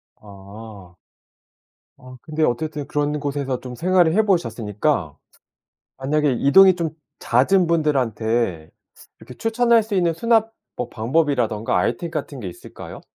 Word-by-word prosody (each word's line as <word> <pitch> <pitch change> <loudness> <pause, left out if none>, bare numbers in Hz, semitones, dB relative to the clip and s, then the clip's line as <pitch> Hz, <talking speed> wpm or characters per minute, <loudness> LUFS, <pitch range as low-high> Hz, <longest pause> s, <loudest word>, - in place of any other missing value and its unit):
아. 100 -2 -13 1.0
아 130 0 -13
근데 155 0 -3
어쨌든 150 +2 -2
그런 150 0 -1
곳에서 140 -3 -3
좀 125 -1 -9
생활을 175 +2 +2
해 220 +4 +3
보셨으니까 115 - -1 0.8
만약에 145 +1 +1
이동이 190 +7 +6
좀 165 -3 -2 0.3
잦은 170 +10 +2
분들한테 115 - 0 0.5
이렇게 125 - -13
추천할 230 0 +2
수 215 -1 -5
있는 175 -3 +1
수납 225 +2 +1 0.2
뭐 125 - -4
방법이라든가 120 -3 0
아이템 170 -2 -1
같은 145 -4 -5
게 100 - -5
있을까요? 85 - -11
145 Hz, 285 characters per minute, -21 LUFS, 115-170 Hz, 1.0 s, 이동이